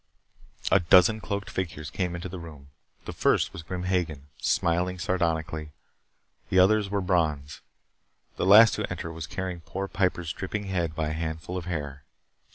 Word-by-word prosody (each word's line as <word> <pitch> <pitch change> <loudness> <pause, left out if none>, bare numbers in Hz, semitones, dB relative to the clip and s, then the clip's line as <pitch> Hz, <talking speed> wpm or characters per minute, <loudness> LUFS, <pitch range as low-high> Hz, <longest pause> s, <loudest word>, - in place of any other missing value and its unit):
A - - +6
dozen 90 +5 +5
cloaked 100 0 -4
figures 80 -5 -4
came 90 -2 -2
into 85 +1 -5
the 95 0 -7
room. 75 -4 -11 0.4
The - - -5
first - - +2
was - - -7
Grim 90 +2 -5
Hagen, 80 -6 -2
smiling 90 +2 +1
sardonically. 80 -4 -1 0.8
The 95 - +1
others 100 +2 +4
were 100 0 0
Brons. 75 -6 0 0.7
The - - -1
last 110 +3 +9
to - - -2
enter 85 - -5
was 80 0 -6
carrying 90 -1 -4
poor 95 +4 -5
Piper's 90 -5 -1
dripping 100 +2 -4
head 85 -5 -2
by 80 -1 -1
a - - -2
handful 80 +2 -4
of 90 -2 -4
hair. 70 -5 -4
90 Hz, 165 wpm, -27 LUFS, 80-95 Hz, 0.8 s, last